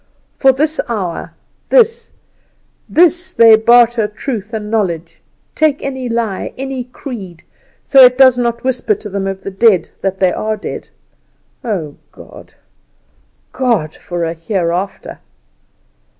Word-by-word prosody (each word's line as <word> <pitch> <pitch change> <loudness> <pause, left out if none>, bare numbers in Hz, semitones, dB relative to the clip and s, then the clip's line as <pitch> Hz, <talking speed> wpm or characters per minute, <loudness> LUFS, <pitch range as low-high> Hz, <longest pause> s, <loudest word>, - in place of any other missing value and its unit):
For 270 - +4
this 305 +4 0
hour 185 -8 -4 0.3
this, 465 -2 +2 0.8
this 355 +2 +2
they 225 -1 +7
barter 235 0 +4
truth 215 -1 -6
and 215 -2 -5
knowledge, 170 -6 -2 0.3
take 305 -2 +1
any 265 -2 -4
lie, 230 -4 -3
any 265 -1 -5
creed, 220 - -9 0.4
so 270 -1 +6
it 250 0 +6
does 260 -2 +6
not 235 -1 -2
whisper 250 -4 0
to 210 +1 -9
them 195 0 -3
of 195 0 -5
the 195 - -5
dead 195 -3 +2
that 195 -1 -2
they 185 -2 +2
are 215 0 -2
dead! - - -7 0.7
Oh, 180 - -4 1.5
God! 225 - -1
for 175 -1 -5
a 165 0 -2
Hereafter!" 175 +2 -3
225 Hz, 125 wpm, -15 LUFS, 190-255 Hz, 1.5 s, they